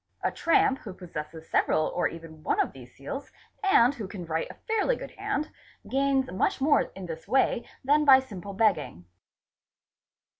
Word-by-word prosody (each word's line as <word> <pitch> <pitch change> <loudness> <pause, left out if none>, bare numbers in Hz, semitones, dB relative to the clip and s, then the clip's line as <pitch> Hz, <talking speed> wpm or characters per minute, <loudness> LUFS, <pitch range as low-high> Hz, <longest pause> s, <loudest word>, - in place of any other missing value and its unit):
A - - +1
tramp 325 -5 +2
_ - - -21
who 195 -5 -8
possesses 160 -3 -8
several 155 - +2
or 175 - 0
even 165 -1 -10
one - - 0
of - - +1
these 125 -2 -13
seals, 210 - -7 0.3
and 275 -9 +5
who 225 -8 -6
can 185 -2 -7
write 160 0 -2
a - - -10
_ - - -30
fairly 445 +2 +2
good - - -8
hand, 400 -6 -3 0.4
gains 270 -1 +1
much 185 - 0
more 285 +1 +4
in 190 -1 -7
this 165 +1 -7
way 250 0 +1
than 295 +3 +4
by 270 -3 +8
simple 200 -7 -8
begging. 195 - +1
215 Hz, 180 wpm, -27 LUFS, 165-275 Hz, 0.4 s, by